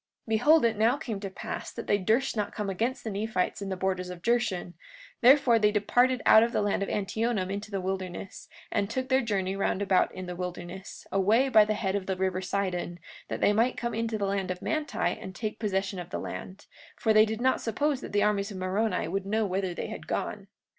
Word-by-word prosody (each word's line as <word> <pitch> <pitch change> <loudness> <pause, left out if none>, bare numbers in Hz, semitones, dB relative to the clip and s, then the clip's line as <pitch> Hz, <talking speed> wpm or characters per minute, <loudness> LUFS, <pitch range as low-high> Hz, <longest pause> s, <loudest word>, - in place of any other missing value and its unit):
43:22 - - -10
Behold, 235 +1 +4
now 225 +4 +4
it 290 - -11
came 220 -8 -4
to 195 -1 -5
pass 190 - -6
that - - -7
they 205 - +2
durst 225 +8 +1
not 210 -2 -1
come 210 -3 -2
against 230 +7 -2
the 220 - -3
Nephites 205 -1 -1
in 200 - -4
the 190 - -3
borders 185 -1 -1
of 180 -1 -9
Jershon; 220 -7 0 0.5
therefore 250 -2 +6
they 210 -1 +4
departed 245 +4 +2
out 220 - +8
of 235 +2 +1
the - - +1
land 205 -1 0
of 200 - -1
Antionum 205 -1 -1
into 205 +2 -4
the 200 -2 -2
wilderness, 185 0 -5 0.2
and 200 0 0
took 260 +3 -3
their 260 0 +4
journey 195 -5 -1
round 195 -1 0
about 195 -2 +2
in 185 - -7
the 180 0 -5
wilderness, 180 +1 -7
away 215 +7 +3
by 215 -4 +7
the 215 0 0
head 195 -3 -1
of 195 -2 -2
the 190 - 0
river 185 0 0
Sidon, 185 -2 -2 0.3
that - - -4
they 205 - +4
might 230 +4 +2
come 235 -1 -2
into 225 0 -1
the 200 - -1
land 195 -1 -1
of 180 -1 -4
Manti 310 -2 -2 0.2
and 190 - -8
take 215 +2 -4
possession 195 -3 -1
of 175 0 -7
the - - -3
land; 190 +2 -7 0.3
for 220 - +2
they 215 0 +7
did 220 0 -2
not 260 +1 +2
suppose 275 +4 0
that - - -7
the 205 0 +2
armies 205 -1 +1
of 200 - -7
Moroni 185 -1 0
would 195 +3 -3
know 220 +2 +1
whither 190 -2 -2
they - - -4
had - - -8
gone. - - -3
205 Hz, 230 wpm, -28 LUFS, 190-225 Hz, 0.5 s, out